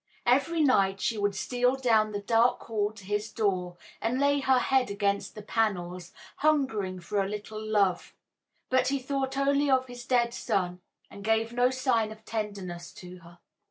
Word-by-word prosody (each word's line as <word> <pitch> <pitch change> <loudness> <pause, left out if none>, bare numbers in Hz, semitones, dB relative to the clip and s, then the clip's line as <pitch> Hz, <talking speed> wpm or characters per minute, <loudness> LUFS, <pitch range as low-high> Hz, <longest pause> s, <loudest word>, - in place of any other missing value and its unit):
Every 280 +7 +2
night 195 -9 +3
she 220 +2 -1
would 205 -1 0
steal 250 +5 +1
down 225 -5 +2
the 205 -1 -4
dark 230 +3 +3
hall 210 -2 -1
to 205 -3 -14
his 210 +2 -2
door, 185 -5 -1 0.2
and 235 +3 0
lay 285 0 +3
her 265 -1 +3
head 260 -1 +2
against 200 +1 -1
the 210 - -8
panels, 185 -5 -2 0.3
hungering 260 -12 +1
for 200 +4 -1
a 195 - -4
little 210 +1 -6
love; 205 -4 0 0.6
but 260 0 +3
he 275 +1 +1
thought 270 0 -3
only 280 +1 +2
of 260 -1 +3
his 245 -1 -9
dead 240 -2 +2
son, 185 -7 -2 0.3
and 200 - -10
gave 225 +2 +1
no 245 +1 +3
sign 255 -4 0
of 220 0 -13
tenderness 200 -6 -5
to 180 0 -11
her. 170 0 -16
220 Hz, 175 wpm, -28 LUFS, 200-255 Hz, 0.6 s, night